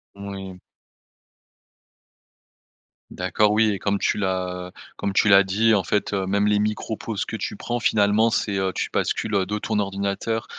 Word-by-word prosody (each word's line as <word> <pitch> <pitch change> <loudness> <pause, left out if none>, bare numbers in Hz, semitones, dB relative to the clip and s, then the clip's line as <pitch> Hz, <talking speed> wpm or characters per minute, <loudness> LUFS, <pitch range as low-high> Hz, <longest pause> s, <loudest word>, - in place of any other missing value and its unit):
Moui. 95 -2 -8 2.5
D'accord. 105 -1 +1
Oui 110 0 +3
et 100 - -3
comme 100 +1 0
tu - - 0
l'as 90 -2 -2 0.2
comme 100 - -3
tu 105 - +3
l'as 100 0 +8
dit 105 +4 +2
en 100 - +2
fait, 105 +4 -1
heu, 95 -1 -1
même 100 +2 +1
les 105 0 +3
micros 105 +1 -2
pauses 110 -1 -4
que - - -5
tu - - -4
prends 120 0 -3
finalement 105 +1 +3
c'est, 100 -3 -1
heu 95 0 0
tu - - -2
bascules, 110 - -1
heu, 95 -2 +2
de 105 +2 -2
ton 105 0 -1
ordinateur, 100 +3 -2
100 Hz, 170 wpm, -23 LUFS, 95-105 Hz, 2.5 s, l'as